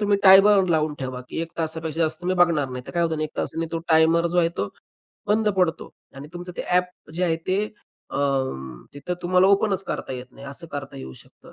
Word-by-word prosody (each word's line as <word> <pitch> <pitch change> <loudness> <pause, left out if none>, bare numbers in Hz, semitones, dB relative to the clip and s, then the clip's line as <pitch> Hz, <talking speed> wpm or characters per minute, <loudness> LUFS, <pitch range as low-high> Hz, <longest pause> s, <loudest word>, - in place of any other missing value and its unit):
तुम्ही 205 -1 +2
time 195 0 +9
bound 195 -3 +4
लावून 155 -2 +1
ठेवा 130 -2 -5
की - - -4
1 165 - -7
तासापेक्षा 160 0 -1
जास्त 160 +1 0
मी 185 +1 +1
बघणार 170 -6 +3
नाही. 125 0 -6
तर - - -7
काय 170 - +1
होत 165 - +1
नाही 155 - -1
1 155 - -9
तासाने 165 0 -2
तो 165 - -1
टायमर 165 +1 +4
जो 175 +1 0
आहे, 170 -1 +4
तो 100 -12 -3 0.6
बंद 215 +1 +2
पडतो 180 -3 0 0.3
आणि 140 +2 -9
तुमचं 180 +1 -7
ते - - -2
ॲप 180 -3 -1
जे 180 +2 0
आहे 165 -2 +1
ते 190 +3 +1 0.5
अ, - - -4 0.8
तिथं 145 +5 -4
तुम्हाला 180 +1 +4
ओपनच 200 -1 +2
करता - - -4
येत 125 0 -6
नाही. 140 - -12
असं 140 +5 -7
करता 140 -1 -6
येऊ 65 -1 -8
शकतं - - -19
165 Hz, 225 wpm, -24 LUFS, 155-180 Hz, 0.8 s, time